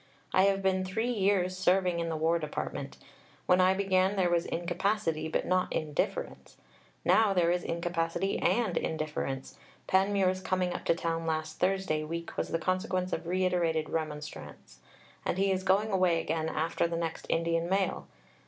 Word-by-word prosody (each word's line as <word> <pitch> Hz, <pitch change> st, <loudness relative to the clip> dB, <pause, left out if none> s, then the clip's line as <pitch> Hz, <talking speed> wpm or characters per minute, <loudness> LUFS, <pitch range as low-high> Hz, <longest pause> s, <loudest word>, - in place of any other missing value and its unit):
I 185 Hz, -, +5 dB
have 195 Hz, 0 st, +1 dB
been 190 Hz, 0 st, +2 dB
three 220 Hz, +6 st, -1 dB
years 195 Hz, -4 st, +1 dB
"serving 185 Hz, -1 st, +2 dB
in" 165 Hz, 0 st, -2 dB
the 160 Hz, -, -2 dB
War 165 Hz, +2 st, +2 dB
Department. 150 Hz, -2 st, -5 dB, 0.5 s
When 180 Hz, 0 st, +4 dB
I 185 Hz, +1 st, +4 dB
began, 190 Hz, 0 st, +2 dB
there 180 Hz, -3 st, +2 dB
was 170 Hz, 0 st, +1 dB
incapacity, 175 Hz, -2 st, -1 dB
but 160 Hz, -, -1 dB
not 185 Hz, 0 st, +1 dB
indifference. 150 Hz, -2 st, -3 dB, 0.5 s
Now 220 Hz, -3 st, +4 dB
there 170 Hz, -1 st, +3 dB
is 175 Hz, 0 st, 0 dB
incapacity 170 Hz, +2 st, -1 dB
and 220 Hz, -8 st, +1 dB
indifference.... 150 Hz, -4 st, -3 dB, 0.3 s
Panmure's 190 Hz, -1 st, +2 dB
coming 185 Hz, -1 st, 0 dB
up -, -, -6 dB
to 170 Hz, -, +3 dB
town 165 Hz, -1 st, -2 dB
last 155 Hz, 0 st, -2 dB
Thursday 185 Hz, -4 st, +1 dB
week 170 Hz, +2 st, -5 dB
was -, -, -1 dB
the -, -, -1 dB
consequence 185 Hz, +1 st, -1 dB
of -, -, -3 dB
reiterated 175 Hz, -3 st, 0 dB
remonstrance.... 150 Hz, -, -6 dB, 0.4 s
And -, -, -1 dB
he 195 Hz, 0 st, +2 dB
is 190 Hz, 0 st, 0 dB
going 195 Hz, +3 st, +2 dB
away 185 Hz, -3 st, +3 dB
again 160 Hz, 0 st, -1 dB
after 165 Hz, +1 st, 0 dB
the 165 Hz, 0 st, -3 dB
next 165 Hz, -1 st, -4 dB
Indian 165 Hz, +1 st, 0 dB
mail. 195 Hz, 0 st, 0 dB
180 Hz, 160 wpm, -30 LUFS, 165-190 Hz, 0.5 s, I